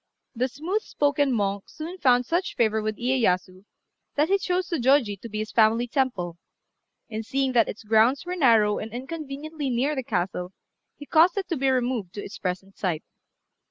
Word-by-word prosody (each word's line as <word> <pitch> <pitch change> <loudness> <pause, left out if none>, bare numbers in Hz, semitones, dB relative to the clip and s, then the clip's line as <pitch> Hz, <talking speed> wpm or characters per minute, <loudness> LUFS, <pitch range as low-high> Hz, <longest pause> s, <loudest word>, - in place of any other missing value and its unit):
The 250 +1 0
smooth 340 - -2
spoken 285 -4 +1
monk 200 -4 -1
soon 340 +4 -8
found 250 -4 +4
such 350 +5 -1
favour 220 -2 +2
with 215 0 -3
Iyéyasu, 190 -7 0 0.5
that 300 +2 +2
he 395 +1 +3
chose 365 -1 -1
Zôjôji 260 - +2
to 230 - -8
be 215 - -5
his 215 0 -3
family 225 +1 +4
temple; 200 - -1 0.7
and 220 0 -5
seeing 270 +3 0
that 235 -3 +3
its 210 - -7
grounds 225 +7 +3
were 360 +1 -3
narrow 225 - +4
and 220 - -6
inconveniently 290 +3 -5
near 255 +5 +1
the 265 - -1
castle, 180 -4 -2 0.4
he 290 - -10
caused 335 +6 +4
it 390 - -1
to 335 - 0
be 270 -1 +1
removed 245 -7 -1
to 205 - -5
its 205 - -9
present 190 +1 -4
site. 175 -5 -1
245 Hz, 180 wpm, -25 LUFS, 210-290 Hz, 0.7 s, found